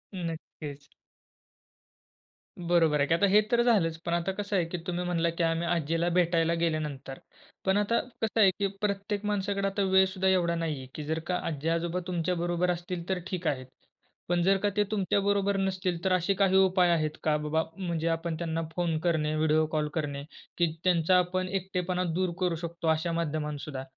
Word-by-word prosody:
नक्कीच. 155 -4 -7 1.7
बरोबर 170 -4 +3
आहे 140 - +2
की. 165 - +2
आता 185 - +3
हे 210 +1 +7
तर 240 0 +4
झालंच, 190 -9 +2
पण 170 - -1
आता 170 +2 0
कसं 200 +1 -3
आहे 180 -3 +2
की 180 - -3
तुम्ही 180 0 -2
म्हणलात 170 -1 +1
की 175 - +1
आम्ही 165 +1 0
आज्जीला 165 0 0
भेटायला 170 -1 +3
गेल्यानंतर. 150 -5 -2 0.5
पण 190 +1 +3
आता 210 +3 +2 0.2
कसं 225 0 0
आहे 195 - +7
की 200 - +2
प्रत्येक 205 0 -2
माणसाकडे 200 -1 0
आता 195 +1 -1
वेळसुद्धा 190 0 +3
एवढा 175 -2 +2
नाहीये, 155 -5 -3
की 155 - -5
जर 160 +2 -1
का 180 - 0
आज्जी-आजोबा 165 +3 -1
तुमच्याबरोबर 175 0 0
असतील 175 0 -5
तर 190 -1 0
ठीक 180 -3 -3
आहे. 130 -4 -1 0.6
पण 175 0 +2
जर 195 +2 +4
का 205 - +3
ते 210 - +5
तुमच्याबरोबर 200 0 +1
नसतील 185 -3 -1
तर 190 -1 +2
असे 185 +2 +2
काही 195 -1 +2
उपाय 185 -2 +4
आहेत 155 -2 0
का, 150 -1 +2
बाबा 150 +2 0
म्हणजे 170 -4 -2
आपण 165 0 -1
त्यांना 165 -1 -2
फोन 170 -3 0
करणे, 155 -3 0
व्हिडिओ 155 0 +3
कॉल 150 -1 0
करणे 145 -3 -3 0.3
की 170 -2 +2
त्यांचा 180 0 +4
आपण 185 +1 -1
एकटेपणा 180 -1 -2
दूर 185 +1 0
करू 180 -2 +1
शकतो 170 0 -5
अशा 160 +2 +1
माध्यमातसुद्धा? 150 -4 -3
175 Hz, 175 wpm, -28 LUFS, 160-190 Hz, 1.7 s, हे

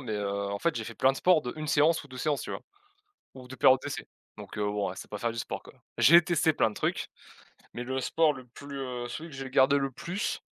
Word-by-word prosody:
mais 120 -5 -5
heu, 105 -1 -2 0.2
en 100 - -3
fait, 170 - 0
j'ai 110 - -3
fait 115 - -8
plein 130 +3 +3
de - - -8
sport 175 -1 +4
d'1 155 +5 -5
séance 155 +3 +3
ou - - -15
2 130 - -10
séances, 145 +1 -1
tu - - -6
vois? - - -4 0.7
Ou 130 -1 -11
de 130 - -9
périodes 130 -1 +6
d'essai 145 - -5 0.3
donc - - -9
heu, 105 - 0
bon 105 -2 -1
c'est - - -10
pas 105 - -5
faire 115 +1 -1
du 115 - -7
sport, - - -4
quoi. - - -15 0.2
J'ai 170 +1 +8
testé 160 -1 +2
plein 115 - +2
de 105 - -11
trucs - - -2 0.7
mais 120 - -4
le 130 +1 -2
sport 155 +4 +2
le 130 -2 -11
plus, 140 +3 -9
heu, 125 -2 -4
celui 165 +6 -6
que 140 - -11
j'ai 135 -1 -6
gardé 135 +2 +4
le 135 -1 -1
plus 185 - -3
130 Hz, 260 wpm, -29 LUFS, 120-150 Hz, 0.7 s, J'ai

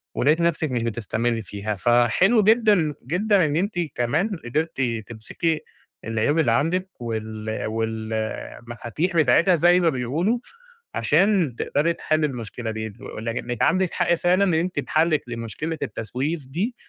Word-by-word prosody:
ولقيتِ 150 +6 +3
نَفْسِك 160 -4 +1
مش 120 -2 -1
بتستمرّي 115 +1 -1
فيها. 105 +1 -4
فحلو 120 - +3
جدًا، 210 -8 +4
جدًا 190 +3 +2
إن 145 0 -1
أنتِ 190 +2 -1 0.2
كمان 150 - +1 0.2
قدرتِ 155 +3 -1 0.3
تمسكي 135 +8 -2 0.4
العيوب 115 +8 +1
اللي 130 -7 +3
عندِك 170 +9 +1
وال 110 -1 -4
وال 110 0 -3 0.5
المفاتيح 120 - -3
بتاعتها 165 +6 +5
زي 175 +3 +5
ما 170 -2 +3
بيقولوا، 155 - 0 0.6
عشان 190 - +2
تقدري 165 +4 +1
تحلّي 155 -1 0
المشكلة 115 -2 -5
دي، 110 -1 -5
ولك 115 +1 -5
إنِك 120 -2 -4
عندِك 185 0 +2
حق 170 - +2
فعلًا 180 +3 +2
لإن 160 - +2
أنتِ 180 +2 -2
بحَلك 155 -1 +1
لمشكلة 120 +8 -4
التسويف 130 +7 -3
دي، 195 - -2
150 Hz, 140 wpm, -23 LUFS, 115-175 Hz, 0.6 s, بتاعتها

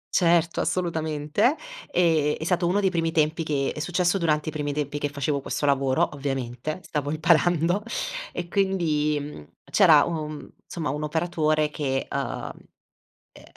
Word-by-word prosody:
Certo, 170 -2 +3
assolutamente, 165 - 0 0.3
ehm, 160 -4 +2
è - - -6
stato 175 0 +1
uno 195 +4 +2
dei 190 -2 +2
primi 165 -2 0
tempi 160 0 +1
che 145 -4 -1
è - - -5
successo 175 +3 +1
durante 155 -2 +1
i - - -5
primi 145 -1 -3
tempi 145 0 -3
che 145 - -1
facevo 140 0 -2
questo 145 - -3
lavoro, 135 -2 +2
ovviamente, 135 +2 -4
stavo 145 -2 -3
imparando 170 +4 +2 0.5
e 175 - -5
quindi, 170 -6 +1
mhmm, 145 - -8 0.2
c'era, - - +7
uhm, 155 -3 -5 0.2
somma, 160 -5 -3
un 150 +2 -4
operatore 155 -1 0
che, 135 -3 -2
uhm, - - -3 0.8
ehm, - - -16
155 Hz, 150 wpm, -25 LUFS, 145-170 Hz, 0.8 s, c'era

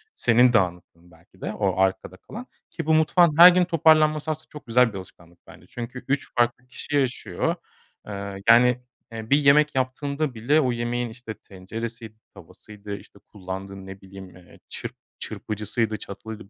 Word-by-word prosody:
senin 120 +1 +4
dağınıklığın 90 -4 -2
belki 85 +3 -23
de - - -4
o 95 -3 -1
arkada 95 -1 0
kalan 235 - -10 0.2
ki 165 - -6
bu 160 - +2
mutfağın 160 0 +4
her 175 +2 +11
gün 180 0 +3
toparlanması 155 -2 +3
aslında 155 0 -7
çok 150 - -12
güzel 120 -1 +3
bir - - -5
alışkanlık 85 -2 -14
bence. - - -16
Çünkü 120 +1 -8
3 140 0 -2
farklı 120 +1 +1
kişi 145 +3 -6
yaşıyor. 125 -9 -1 0.5
Eee, 100 -1 -6
yani, 125 +1 +5 0.3
eee, 110 -1 -8
bir 140 - +5
yemek 150 +1 +4
yaptığında 140 +2 -2
bile 130 +8 +2
o 130 -3 +1
yemeğin, 120 0 -2
işte, 115 -1 -9
tenceresiydi, 110 +4 -8 0.2
tavasıydı, 105 -1 -10
işte, 100 - -17
kullandığı 95 0 -8
ne 95 0 -10
bileyim, 95 0 -12
eee, 90 -1 -18
çırp - - -7 0.2
çırpıcısıydı, 110 +1 -3
çatalıydı, 105 +1 -9
115 Hz, 160 wpm, -24 LUFS, 100-140 Hz, 0.5 s, her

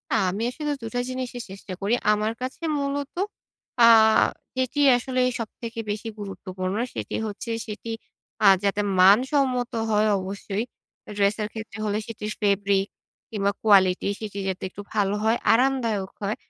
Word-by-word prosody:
আমি 190 +3 0
আসলে 295 +3 -3
২ - - -6
টা - - +1
জিনিসই 255 -1 -4
চেষ্টা 195 -1 -8
করি। 205 +4 0 0.2
আমার 210 +1 +1
কাছে 260 +6 -5 0.2
মূলত 280 0 -3 0.7
আ - - +8 0.7
যেটি 260 +3 -1 0.2
আসলে 255 +1 -3 0.2
সবথেকে 230 +1 -6
বেশি 215 +2 -5
গুরুত্বপূর্ণ 190 -1 -4 0.2
সেটি - - -4
হচ্ছে 210 +3 -6 0.2
সেটি 215 +2 -7 0.5
আ - - +5 0.2
যাতে 200 +1 +1 0.2
মানসম্মত 250 +5 +4 0.2
হয় 210 +1 +3
অবশ্যই 200 +2 -4 0.5
এ - - -6
ড্রেসের 205 +1 +1
ক্ষেত্রে 220 -1 -7
হলে 210 0 0
সেটি 220 -2 -7
স - - -17
ফেব্রিক 200 -1 +2 0.4
কিংবা 200 -2 0
কোয়ালিটি 190 -3 +4
সেটি 205 -2 -6
যাতে 190 -1 -3
একটু 205 - -9
ভালো 205 -2 +1
হয়, 225 +2 +3
আরামদায়ক 230 -5 +1
হয়। 205 +2 -1
210 Hz, 145 wpm, -25 LUFS, 200-245 Hz, 0.7 s, আ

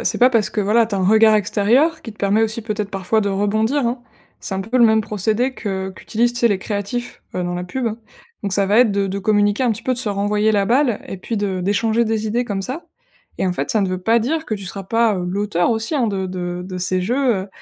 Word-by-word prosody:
c'est - - +1
pas 250 +1 +5
parce 225 -4 +2
que, 215 -1 -2
voilà, 225 +3 +3
tu 215 - -4
as - - 0
un 190 - 0
regard 220 +1 +6
extérieur 230 - +2
qui 225 - -8
te 215 - -15
permet 205 +2 +2
aussi, 220 0 -1
peut-être, 210 -2 -3
parfois, 195 +2 0
de 205 - 0
rebondir, 215 +7 +1
hein. 240 +2 -2 0.4
C'est 195 - -4
un 190 - -2
peu 225 +6 -2
le 240 - +7
même 220 -1 +4
procédé 215 +5 0
que 190 -4 -4
qu'utilisent, 235 +4 0
tu 240 - -3
sais, 235 - +4
les 200 -3 +1
créatifs, 205 +4 -4
heu, 180 - -1
dans 175 0 -3
la 180 0 -4
pub, 245 +7 -3
hein. 225 0 -3 0.4
Donc, 200 -2 -2
ça 200 - +3
va 205 +3 +3
être 245 -3 +5
de 200 0 0
de 195 +1 -3
communiquer 205 +3 +2
un 245 - +2
petit 210 - -7
peu, 260 - 0
de 250 - -2
se 240 - -1
renvoyer 205 +2 +1
la 200 -2 +2
balle 245 0 +2
et 195 - -7
puis 225 +5 -4
de 195 -3 -1
d'échanger 220 +5 +1
des 220 0 -1
idées 235 +3 0
comme 195 -4 -3
ça. 265 - -5 0.5
Et - - 0
en 180 - 0
fait, - - -3
ça 220 - +2
ne 195 - 0
veut 185 0 -2
pas 225 +5 +3
dire 315 +8 -1
que 215 - -2
tu 200 -2 -7
seras 195 +2 -5
pas, 225 +2 +2
heu, 180 - -3
l'auteur 195 0 0
aussi, 225 +6 -1
hein, 260 -5 +2
de 195 -3 -2
de 180 -1 -4
de 185 -1 -6
ces 185 +1 0
jeux, 245 +3 +1
heu, - - -14
210 Hz, 275 wpm, -20 LUFS, 195-230 Hz, 0.5 s, le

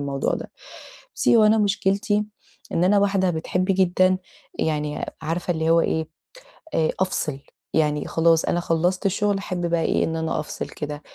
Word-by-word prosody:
الموضوع 140 -1 -1
ده. - - -7 0.7
بُصّي، - - +4
هو 220 - +6
أنا 215 +1 +5
مشكلتي 205 +1 +1 0.5
إن 175 - +2
أنا 200 +2 +4
واحدة 195 -2 +2
بتحب 175 +3 -1
جدًا 185 -1 +3 0.4
يعني، 150 -1 -1 0.2
عارفة 170 +3 -2
اللي 160 0 0
هو 165 0 +5
إيه، 160 0 -1 0.7
آآ 160 -1 +2
أفصل. 155 -7 -1 0.4
يعني 150 -2 +1
خلاص، 165 0 +3
أنا 175 - 0
خلصت 175 +3 0
الشغل، 205 +1 +1
أحب 185 -2 -3
بقى 170 -1 +1
إيه، - - +1
إن 165 - -2
أنا 160 -1 -1
أفصل 150 - -5
كده. 150 -1 -6
175 Hz, 160 wpm, -23 LUFS, 160-195 Hz, 0.7 s, هو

